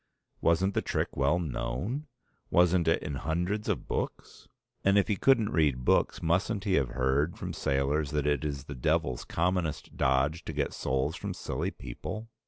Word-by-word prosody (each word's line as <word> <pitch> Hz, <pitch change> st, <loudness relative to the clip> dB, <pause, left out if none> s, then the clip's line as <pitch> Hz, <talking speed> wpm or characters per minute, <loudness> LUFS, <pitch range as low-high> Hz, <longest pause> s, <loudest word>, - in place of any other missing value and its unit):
Wasn't 90 Hz, +4 st, +3 dB
the -, -, +1 dB
trick -, -, -2 dB
well 70 Hz, +5 st, +2 dB
known? 90 Hz, -, -3 dB, 0.4 s
Wasn't 90 Hz, -1 st, +4 dB
it 80 Hz, -, +2 dB
in 75 Hz, -2 st, -3 dB
hundreds 90 Hz, +8 st, -1 dB
of -, -, -1 dB
books? -, -, -4 dB, 0.4 s
And 100 Hz, +1 st, +4 dB
if 100 Hz, -, +4 dB
he 105 Hz, -, +1 dB
couldn't 115 Hz, -1 st, +3 dB
read 70 Hz, -6 st, +1 dB
books -, -, +2 dB
mustn't 95 Hz, +5 st, +1 dB
he 100 Hz, -, 0 dB
have 65 Hz, -8 st, +2 dB
heard 65 Hz, +6 st, +1 dB
from -, -, -5 dB
sailors 70 Hz, +2 st, 0 dB
that 75 Hz, -1 st, -1 dB
it 75 Hz, +1 st, +1 dB
is 70 Hz, -2 st, -3 dB
the 70 Hz, -, -7 dB
Devil's 60 Hz, -1 st, 0 dB
commonest 90 Hz, -2 st, -1 dB
dodge 65 Hz, +6 st, +2 dB
to -, -, -4 dB
get 70 Hz, -1 st, -1 dB
souls 65 Hz, 0 st, -1 dB
from -, -, -5 dB
silly -, -, -2 dB
people? 105 Hz, -, -7 dB
80 Hz, 175 wpm, -29 LUFS, 70-90 Hz, 0.4 s, Wasn't